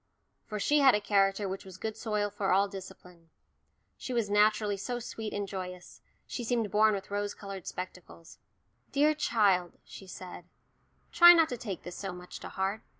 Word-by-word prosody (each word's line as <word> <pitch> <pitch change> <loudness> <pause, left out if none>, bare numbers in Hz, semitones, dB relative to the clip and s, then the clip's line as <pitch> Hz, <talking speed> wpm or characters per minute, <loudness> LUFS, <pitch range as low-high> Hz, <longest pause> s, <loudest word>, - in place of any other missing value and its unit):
For 210 - -4
she 295 +8 +3
had 270 -5 +6
a - - +1
character 200 -1 +1
which 190 +1 -5
was 190 -1 -11
good 220 +2 -4
soil 210 -2 -2
for 200 -1 -1
all 195 +2 +4
discipline. 180 -3 -12 0.7
She 255 - -5
was 225 -4 0
naturally 210 0 +3
so 240 +5 -4
sweet 220 -2 -6
and 205 -1 -3
joyous 180 -2 -8 0.2
she 245 - -5
seemed 230 -3 -1
born 215 +1 +4
with 195 0 -7
rose 205 0 -2
coloured 195 -3 -8
spectacles. 180 -2 -9 0.5
"Dear 295 +2 +3
child," 200 - +1
she 195 - -12
said, 180 -1 -9 0.7
"try 345 0 +9
not 330 -2 +4
to 250 - -3
take 205 -6 -6
this 175 - -8
so 195 -2 -5
much 180 0 -10
to - - -8
heart. 195 +3 -2
205 Hz, 180 wpm, -30 LUFS, 190-220 Hz, 0.7 s, try